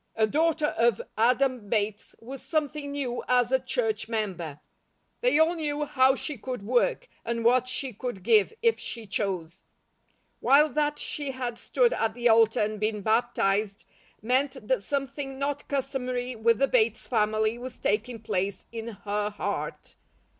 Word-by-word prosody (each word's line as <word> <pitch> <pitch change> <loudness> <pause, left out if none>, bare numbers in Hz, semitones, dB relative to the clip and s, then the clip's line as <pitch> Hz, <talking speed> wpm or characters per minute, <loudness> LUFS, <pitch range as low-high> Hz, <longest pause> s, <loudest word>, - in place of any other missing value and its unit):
A 220 - +3
daughter 310 +4 +1
of 230 -3 +3 0.2
Adam 250 -1 +2
Bates 210 -1 -1
was 260 +3 -9
something 300 -2 -2
new 265 -4 -3
as 250 -1 +3
a 265 - +4
church 225 -4 -1
member. 180 -10 -3 0.6
They - - +3
all 320 +2 +4
knew 300 -3 -2
how 265 -1 +4
she 285 -2 -5
could 250 -2 -5
work, 255 - +1 0.2
and 230 0 -2
what 250 +1 +4
she 255 0 -2
could 210 -3 -5
give 215 -2 +4
if 460 -1 +3
she 230 -2 -6
chose; 190 -4 -3 0.8
while 295 +3 +5
that 295 +1 0
she 290 -2 -3
had 250 -3 -4
stood - - +2
at 225 0 -1
the 240 -1 +2
altar 225 0 +5
and 210 0 -1
been 215 0 -1
baptized, 215 -3 +1 0.4
meant 255 -1 0
that 260 -4 +1
something 275 +2 -3
not 280 +1 -3
customary 255 -2 -2
with 230 0 +3
the 275 - +3
Bates 450 - +2
family 215 0 +1
was 250 0 -7
taking 225 +3 -1
place 200 -2 -2
in 230 -1 -6 0.2
her 205 0 0
heart. 205 - -4
245 Hz, 155 wpm, -27 LUFS, 215-275 Hz, 0.8 s, while